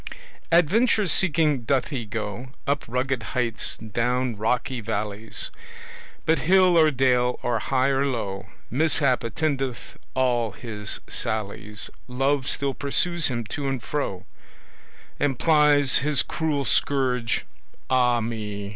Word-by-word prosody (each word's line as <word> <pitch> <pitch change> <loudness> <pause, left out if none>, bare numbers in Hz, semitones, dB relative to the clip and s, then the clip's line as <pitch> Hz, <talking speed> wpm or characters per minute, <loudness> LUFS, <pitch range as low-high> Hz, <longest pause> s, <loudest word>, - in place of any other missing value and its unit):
Adventure 210 +7 +4
seeking 155 -5 +2
doth 130 +2 0
he 120 -7 -4
go 110 +3 -5 0.2
Up 145 +1 -1
rugged 125 +1 -1 0.2
heights, 120 -3 +2
down 120 +3 -1
rocky 120 +3 -1
valleys, 105 0 -3 0.7
But 160 +1 +3
hill 185 +1 +4
or 160 -2 +6
dale, 125 -2 +2
or 120 -2 0
high 130 +3 +1
or 135 0 +1
low, 105 -8 -3 0.2
Mishap 140 -2 +2
attendeth 135 -1 -3 0.2
all 120 -4 +1
his 105 -4 -5
sallies: 105 -2 -1 0.2
Love 135 +2 0
still 140 -1 -1
pursues 170 +5 0
him 120 -3 -2
to 140 -1 -3
and 130 -3 -3
fro, 120 -11 -3 0.9
And 140 -3 +1
plies 150 -3 +4
his 145 -1 +1
cruel 150 -4 -1
scourge 125 -2 +1 0.4
ah 125 -2 +3
me! 105 -3 -4
130 Hz, 120 wpm, -24 LUFS, 115-145 Hz, 0.9 s, or